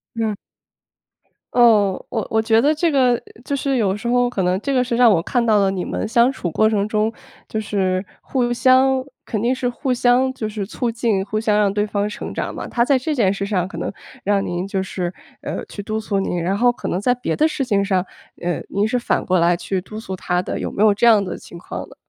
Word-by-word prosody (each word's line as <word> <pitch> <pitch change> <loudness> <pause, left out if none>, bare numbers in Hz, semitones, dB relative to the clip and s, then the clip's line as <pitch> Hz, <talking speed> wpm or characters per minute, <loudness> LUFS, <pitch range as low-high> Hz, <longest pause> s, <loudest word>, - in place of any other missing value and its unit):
嗯。 220 -2 -1 1.2
哦， 215 -6 +4
我 225 -3 -2
我 220 - +3
觉 225 +1 +3
得 295 +3 +3
这 330 +2 +1
个， 255 -4 +3 0.2
就 280 - -2
是 275 0 0
有 205 -5 +1
时 220 +3 -5
候， 245 0 +2
可 195 -6 -2
能 180 +1 +2
这 275 - -2
个 255 - +3
是 245 -1 -1
让 240 -2 +6
我 165 -4 +3
看 240 +6 0
到 215 -2 +4
了 195 - +3
你 190 -2 -2
们 - - -3
相 235 +3 +4
处 180 -9 -4
过 220 +7 +3
程 205 -1 0
中， 215 +1 0 0.4
就 220 - -2
是 190 -3 -1 0.2
互 245 -2 -1
相 260 +1 +4 0.2
肯 215 -4 -2
定 240 +3 +2
是 255 -1 -2
互 250 +2 -1
相 250 +2 +3
就 230 -5 -4
是 210 -2 -4
促 235 +3 -2
进， 225 -4 0
互 215 +1 -2
相 210 -1 +2
让 200 -1 +2
对 210 0 +1
方 205 -1 -1
成 210 - -6
长 - - -3
嘛。 - - -5
他 235 0 +1
在 275 +1 +3
这 280 +5 -2
件 205 -8 +2
事 200 0 -3
上 185 -3 0
可 - - -9
能 - - -3 0.3
让 200 0 +1
您 175 +1 -3
就 195 -1 -2
是 180 -2 -4 0.5
去 205 - -7
督 220 +1 -2
促 200 -3 -1
您， 175 -2 -2
然 190 +4 0
后 245 +2 +4
可 - - -7
能 185 - -1
在 250 - +3
别 250 - -2
的 310 - +3
事 275 -4 -2
情 200 -4 +1
上， 190 -2 0 0.4
呃， 175 0 -2
您 205 +2 +1
是 250 - 0
反 240 - -1
过 185 0 +2
来 170 +1 +3
去 185 +1 -2
督 215 +3 -8
促 190 -4 -6
他 180 -1 -1
的。 - - -4
有 - - -4
没 200 - -3
有 215 -1 +6
这 235 +4 +1
样 220 -3 +6
的 185 - -5
情 170 - -12
况 170 - -7
呢？ - - -15
215 Hz, 265 characters per minute, -20 LUFS, 195-245 Hz, 1.2 s, 让